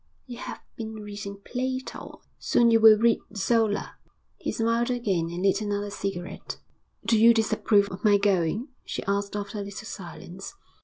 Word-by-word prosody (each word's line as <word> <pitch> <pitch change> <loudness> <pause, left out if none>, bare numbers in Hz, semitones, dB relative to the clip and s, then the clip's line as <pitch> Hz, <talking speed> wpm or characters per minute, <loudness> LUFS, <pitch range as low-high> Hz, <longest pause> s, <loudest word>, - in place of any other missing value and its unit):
'You 245 -2 -9
have - - -7 0.2
been 220 -1 -5
reading 205 -1 -7
Plato; 260 +1 -4 0.2
soon 235 -1 +3
you 225 - +5
will 220 -1 +8
read 230 +1 +3 0.2
Zola.' 220 0 +1 0.4
He - - -3
smiled 230 +1 +1
again, 195 -9 0
and 175 +2 -4
lit 195 +1 +3
another 205 -1 -2
cigarette. 190 -2 -5 0.5
'Do 225 - +3
you 230 +1 +7
disapprove 215 -2 +3
of 185 - -8
my 205 -2 +6
going?' 200 - +1
she - - -5
asked 200 +1 -1
after 205 0 -4
a - - -3
little 200 +1 -8
silence. 190 - -8
205 Hz, 160 wpm, -26 LUFS, 200-230 Hz, 0.5 s, will